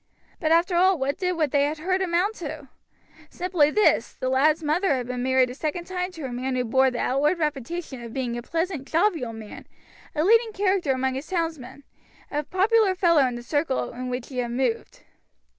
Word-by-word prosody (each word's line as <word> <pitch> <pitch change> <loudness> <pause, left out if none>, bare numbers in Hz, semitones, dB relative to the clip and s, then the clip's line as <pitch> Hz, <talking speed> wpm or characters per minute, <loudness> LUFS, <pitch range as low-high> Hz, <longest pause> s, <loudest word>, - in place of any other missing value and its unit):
But 315 - 0
after 345 +2 +3
all 370 +1 +4
what 280 +3 -2
did 365 -1 0
what 310 -5 0
they 285 0 +3
had 300 +2 -2
heard 370 +4 -1
amount 365 +3 +1
to? 295 -4 -7 0.6
simply 350 -5 +1
this, 425 +6 +2
the 255 - -3
lad's 305 +5 +3
mother 310 +2 +1
had 250 -2 -3
been 250 0 -4
married 260 0 +2
a - - -6
second 310 +5 -3
time 360 0 -3
to 320 -5 -7
a 255 - -5
man 255 +1 -2
who 250 - 0
bore 265 +3 +3
the 250 - -5
outward 285 +9 +1
reputation 300 -2 -3
of 235 -1 -8
being 245 -1 -3
a 240 - -4
pleasant, 330 0 -3
jovial 330 - +1
man, 220 -2 -10 0.5
a 305 - +1
leading 450 +3 +4
character 385 -7 +1
among 260 0 0
his 270 +3 -5
townsmen, 315 -7 -4 0.5
a 295 - 0
popular 390 +4 +2
fellow 335 -7 +4
in 245 - -4
the 240 - -7
circle 290 0 -1
in 250 +1 -5
which 250 -1 -4
he 250 -2 -2
moved. 445 - -2
300 Hz, 200 wpm, -25 LUFS, 260-360 Hz, 0.6 s, all